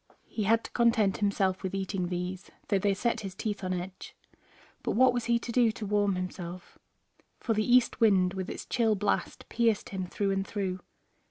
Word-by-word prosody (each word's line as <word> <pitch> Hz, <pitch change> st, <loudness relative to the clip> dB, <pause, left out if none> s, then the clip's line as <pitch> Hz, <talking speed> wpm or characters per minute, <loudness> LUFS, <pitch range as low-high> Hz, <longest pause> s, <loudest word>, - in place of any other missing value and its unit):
He 215 Hz, -, -3 dB
had 225 Hz, +3 st, +3 dB
to -, -, -9 dB
content 230 Hz, -5 st, +3 dB
himself 200 Hz, -2 st, +1 dB
with 190 Hz, 0 st, -3 dB
eating 190 Hz, -1 st, -2 dB
these, 180 Hz, +1 st, -4 dB, 0.2 s
though 200 Hz, -, +3 dB
they 200 Hz, 0 st, +1 dB
set 235 Hz, +4 st, 0 dB
his 195 Hz, -2 st, -6 dB
teeth 205 Hz, -1 st, -3 dB
on 185 Hz, -, -2 dB
edge. 185 Hz, +1 st, -6 dB, 0.7 s
But -, -, -1 dB
what 255 Hz, +2 st, +5 dB
was 245 Hz, -2 st, -2 dB
he 235 Hz, 0 st, +3 dB
to 235 Hz, 0 st, -5 dB
do 235 Hz, -2 st, +4 dB
to 220 Hz, -, -6 dB
warm 205 Hz, -1 st, +1 dB
himself, 180 Hz, -1 st, -6 dB, 0.6 s
for 230 Hz, -, 0 dB
the 215 Hz, +2 st, 0 dB
east 250 Hz, -1 st, +4 dB
wind 190 Hz, -4 st, +4 dB
with 190 Hz, -1 st, -4 dB
its -, -, -6 dB
chill 225 Hz, -3 st, +2 dB
blast 205 Hz, +1 st, -2 dB
pierced 230 Hz, -3 st, +1 dB
him 190 Hz, -2 st, -4 dB
through 195 Hz, +2 st, -1 dB
and 195 Hz, 0 st, -1 dB
through. 190 Hz, -3 st, -3 dB
200 Hz, 195 wpm, -29 LUFS, 185-225 Hz, 0.7 s, what